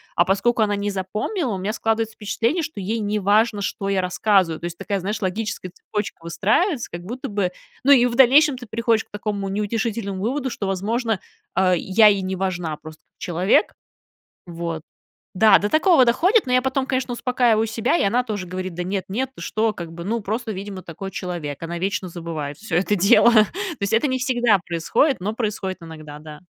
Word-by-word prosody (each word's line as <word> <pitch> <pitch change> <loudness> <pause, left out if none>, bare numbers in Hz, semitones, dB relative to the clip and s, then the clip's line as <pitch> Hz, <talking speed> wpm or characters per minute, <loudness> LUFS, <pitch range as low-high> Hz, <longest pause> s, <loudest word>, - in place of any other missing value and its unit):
а 175 - +5
поскольку 200 +5 +1
она 205 -1 +1
не 205 0 -2
запомнила, 210 - -2
у - - -2
меня 200 +3 -2
складывается 225 0 -1
впечатление, 230 - -1
что 310 -8 -6
ей 215 +4 -2
неважно, 210 +1 +2
что 195 0 -3
я 195 -1 +1
рассказываю, 180 -2 +1
то 170 - -5
есть, 175 0 -5
такая, 200 -2 -2
знаешь, 205 +4 -3
логическая 190 -1 -3
цепочка 210 +1 -5
выстраивается, 230 - 0
как 170 - -6
будто 245 +7 -6
бы, 200 -3 -1 0.3
ну, 280 - +5
и 250 -3 +7
в 235 - -3
дальнейшем 270 +2 +6
ты 245 - -9
приходишь 225 +1 +1
к - - -42
такому 205 -1 -3
неутешительному 210 -1 -2
выводу, 265 +4 -1
что, 210 -4 -4
возможно, 215 +3 -1 0.4
а, 185 -1 +3
я 190 +5 +4
ей 200 -2 +3
не 185 0 -3
важна 180 -4 -2
просто 155 0 -12
как - - -55
человек. 180 - +2 0.7
Вот. 170 -2 -5 0.5
Да, 205 +1 +6
до 205 - -2
такого 315 -3 +5
доходит, 365 - +3
но 250 - -1
я 255 - +5
потом, 265 0 0
конечно, 260 -1 -1
успокаиваю 240 -3 +2
себя, 225 +8 0
и - - +1
она 235 +5 +2
тоже 210 -6 -4
говорит: 185 0 -5
"Да 180 - -3
нет, 190 +1 -2
нет, 255 +7 -2
ты - - -10
что". 220 0 0
Как 170 -4 -7
бы, 170 +1 -8
ну, 230 +4 -1
просто, 220 +2 -3
видимо, 195 -1 -7
такой 185 +4 -7
человек, 170 -7 -5
она 170 +1 -4
вечно 190 0 -2
забывает 160 -4 -5
всё 200 -6 -3
это 200 +3 +2
дело. 200 +5 +6
То 215 -2 +6 0.3
есть, 200 +1 0
это 235 +6 +3
не 260 - 0
всегда 240 -5 +2
происходит, 175 - +1
но 205 +3 -2
происходит 210 -5 -3
иногда, 155 -2 -10
да. 150 0 -11
205 Hz, 200 wpm, -22 LUFS, 185-235 Hz, 0.7 s, и